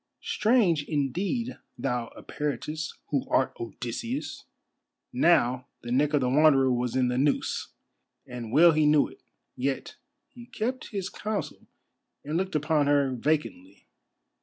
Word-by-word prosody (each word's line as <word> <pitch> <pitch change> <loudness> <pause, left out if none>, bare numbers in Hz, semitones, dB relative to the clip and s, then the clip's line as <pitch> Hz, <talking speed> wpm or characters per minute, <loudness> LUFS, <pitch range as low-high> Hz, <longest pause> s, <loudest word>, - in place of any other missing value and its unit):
Strange, 210 - +2
indeed, 180 - -2 0.2
thou 125 -3 -2
Eperitus, 150 +2 -4 0.2
who 140 -3 -1
art 130 - +2
Odysseus." 125 - -5 0.7
Now 130 - +3
the 120 - -7
neck 145 +4 +2
of 145 - +2
the 125 - +1
Wanderer 135 -2 +5
was 125 0 -1
in 130 -1 +2
the 125 +1 0
noose, 145 +1 0 0.6
and 120 -3 -7
well 165 +6 +7
he 155 -1 +3
knew 150 -1 +4
it: - - -16 0.3
yet 135 +1 -3 0.3
he 240 -1 -14
kept 250 +4 -3
his 195 -3 -3
counsel, 215 -1 -5 0.6
and 150 +2 -3
looked 185 0 -1
upon 150 -1 +2
her 140 -2 +3
vacantly. 115 - -2
150 Hz, 135 wpm, -27 LUFS, 125-175 Hz, 0.7 s, well